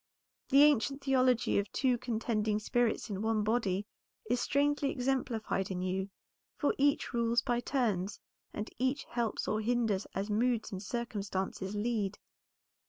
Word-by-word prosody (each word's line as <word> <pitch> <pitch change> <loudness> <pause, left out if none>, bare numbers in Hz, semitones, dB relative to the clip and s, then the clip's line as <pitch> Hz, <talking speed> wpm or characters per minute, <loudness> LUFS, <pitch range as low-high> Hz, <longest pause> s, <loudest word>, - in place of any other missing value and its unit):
The 275 +2 +7
ancient 280 -1 +3
theology 255 -5 +3
of 200 +1 -3
two 255 -3 +1
contending 220 -3 0
spirits 225 +1 0
in 195 0 -3
one 220 -1 +1
body, 210 -3 0 0.4
is 245 +2 +1
strangely 285 0 +1
exemplified 245 -7 -1
in 180 -1 -3
you, 190 +1 -1 0.5
for 290 - +2
each 285 -1 +2
rules 235 0 +2
by 240 -1 +1
turns, 210 -7 -1 0.3
and 210 +1 -5
each 260 +3 0
helps 235 -3 -2
or 215 - 0
hinders 225 -4 0
as 195 +1 -1
moods 230 +2 +1
and 190 -2 -5
circumstances 200 -4 -3
lead. 210 -2 -1
230 Hz, 140 wpm, -32 LUFS, 205-250 Hz, 0.5 s, The